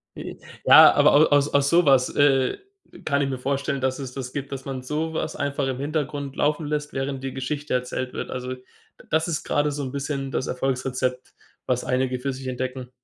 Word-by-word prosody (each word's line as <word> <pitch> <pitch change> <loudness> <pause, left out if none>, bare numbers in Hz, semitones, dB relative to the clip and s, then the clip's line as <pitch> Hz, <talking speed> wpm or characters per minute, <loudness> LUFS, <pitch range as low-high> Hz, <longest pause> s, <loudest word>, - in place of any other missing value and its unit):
I - - -7
i - - -12 0.3
Ja, - - +9
aber - - +5
au 150 +2 +7
aus 145 0 +3
aus 140 0 +3
sowas, 140 -7 +4
äh, 135 -2 +3 0.5
kann 140 -1 +1
ich 140 - 0
mir 130 -2 -4
vorstellen, 140 +1 -2
dass 130 +1 -1
es 130 -2 -6
das 125 -2 -6
gibt, 140 -1 -5
dass 135 -1 -6
man 135 -1 -4
sowas 155 +3 -3
einfach 140 -1 -1
im 130 -1 -3
Hintergrund 145 -1 -3
laufen 150 +2 0
lässt, 150 0 -3
während 135 0 -3
die 135 - -4
Geschichte 140 +2 -3
erzählt 125 0 -2
wird. - - -5
Also, 125 0 -4
d 125 - -19 0.5
das 160 +2 +1
ist 165 -3 -2
gerade 145 0 +1
so 145 0 -4
'n 130 - -4
bisschen 140 -1 -3
das 130 - -2
Erfolgsrezept, 130 -1 -2 0.3
was 125 -1 0
einige 130 0 0
für 135 +2 -2
sich 130 0 -8
entdecken. 130 0 -4
135 Hz, 205 wpm, -24 LUFS, 130-145 Hz, 0.5 s, Ja